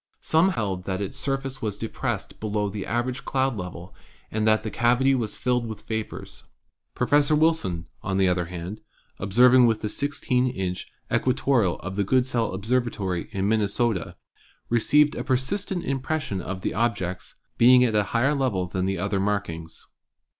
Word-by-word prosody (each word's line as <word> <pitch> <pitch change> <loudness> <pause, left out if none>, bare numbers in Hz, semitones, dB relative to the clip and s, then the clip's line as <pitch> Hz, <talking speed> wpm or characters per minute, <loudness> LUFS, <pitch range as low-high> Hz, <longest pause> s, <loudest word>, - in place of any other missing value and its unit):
Some 165 +4 +3
held 95 -4 -2
that 95 -1 -2
its 100 -2 -4
surface 135 -1 -2
was 105 -3 -2
depressed 115 - -4
below 105 -1 -1
the 100 0 -5
average 120 +2 -2
cloud 135 -2 0
level 90 -2 -7 0.4
and 110 0 0
that 110 0 +3
the 110 - -4
cavity 125 +3 +3
was 115 -5 -2
filled 125 -2 0
with 110 -1 -7
vapors. 110 -1 -5 0.5
Professor 145 +4 +3
Wilson, 150 - +1 0.2
on 95 -1 -2
the 95 -1 +4
other 90 -1 +1
hand, 90 +4 -7 0.4
observing 125 +5 +5
with 110 -2 +1
the 105 - -1
1 - - -4
6 145 0 -3
inch 125 -8 0 0.3
equatorial 125 -7 +2
of 95 +2 -6
the 100 - +2
Goodsell 125 0 +1
Observatory 100 -4 -1
in 95 0 -1
Minnesota, 110 -2 0 0.5
received 145 +6 +4
a - - -4
persistent 175 +8 -1
impression 135 -6 -2
of 95 +2 -5
the - - -2
object's 95 -5 -2 0.2
'being 125 +1 +7
at 120 -3 +1
a 105 -1 +2
higher 120 +8 +1
level 125 -10 0
than 90 +1 -2
the 95 0 -1
other 100 +1 -1
markings.' 95 -5 -3
110 Hz, 160 wpm, -25 LUFS, 95-130 Hz, 0.5 s, being